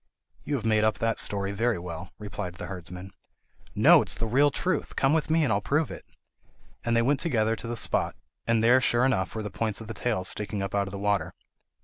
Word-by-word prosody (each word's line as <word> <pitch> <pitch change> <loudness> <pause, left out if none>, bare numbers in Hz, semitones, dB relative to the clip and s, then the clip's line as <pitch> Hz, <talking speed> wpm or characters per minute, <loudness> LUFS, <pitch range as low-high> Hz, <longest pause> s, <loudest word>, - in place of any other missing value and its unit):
"You 145 - -2
have 115 -5 -4
made 110 -1 +3
up 110 -1 +2
that 115 0 0
story 100 -1 +1
very 115 +2 0
well," 85 +1 -7
replied 100 -4 -6
the - - -7
herdsman. 90 0 -7 0.6
"No, - - +7
it - - -5
is - - 0
the 115 - -2
real 135 +6 +4
truth; 180 +6 -2
come 135 +2 +2
with 160 -1 0
me 160 0 +3
and 125 -7 +2
I'll 100 - 0
prove 150 +6 0
it." - - -10 0.8
And 115 -1 +1
they 115 - +3
went 140 +3 +2
together 115 -9 +1
to 115 - -7
the 120 0 -4
spot, - - 0 0.3
and 115 -1 +2
there 125 +3 +5
sure 120 0 +3
enough 115 -9 0
were 110 - -3
the 105 - -5
points 110 0 -2
of 115 - -8
the 115 - -5
tails 105 -4 -2
sticking 105 -1 -1
up 100 - -5
out 100 -1 0
of - - -7
the 100 - -6
water. 100 0 -1
110 Hz, 240 wpm, -27 LUFS, 100-120 Hz, 0.8 s, No